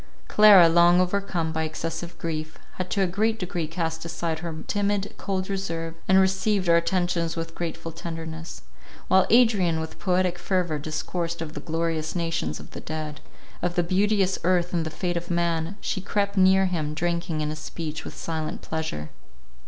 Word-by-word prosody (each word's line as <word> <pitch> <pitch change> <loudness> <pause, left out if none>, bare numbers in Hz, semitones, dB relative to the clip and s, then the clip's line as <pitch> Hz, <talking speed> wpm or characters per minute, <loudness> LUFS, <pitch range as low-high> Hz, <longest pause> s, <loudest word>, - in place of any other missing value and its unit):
Clara, 205 -5 +8
long 175 +1 +6
overcome 180 -3 0
by 160 0 -1
excessive 165 +2 -4
grief, 155 -1 -4 0.2
had 185 0 -3
to 200 - +1
a - - +4
great 215 +5 0
degree 175 -4 -3
cast 160 0 -3
aside 165 -1 -3
her 160 -2 -5
timid, 205 0 0
cold 190 -1 -2
reserve, 165 -4 -3
and 190 0 +6
received 190 0 +2
our 170 - +6
attentions 175 -1 0
with 165 0 -4
grateful 165 -1 -4
tenderness. 165 0 -7 0.5
While 190 0 +5
Adrian 210 -9 +4
with 160 0 -6
poetic 180 -2 +1
fervour 175 -4 0
discoursed 165 +3 -3
of 160 -2 -5
the 145 - -5
glorious 160 0 -2
nations 165 - -1
of - - -12
the - - -8
dead, 155 -1 -5 0.4
of 175 0 -1
the 175 - +3
beauteous 195 +1 +2
earth 180 0 +2
and 165 -2 0
the - - -2
fate 175 +2 -2
of 175 +1 -5
man, 170 +1 0
she 190 - -2
crept 200 +1 -1
near 190 0 +5
him, 155 -5 -2
drinking 170 -1 -1
in 150 0 -1
his 155 - -6
speech 160 -2 -5
with - - -9
silent 160 -2 -4
pleasure. 160 - -4
170 Hz, 175 wpm, -25 LUFS, 160-185 Hz, 0.5 s, Clara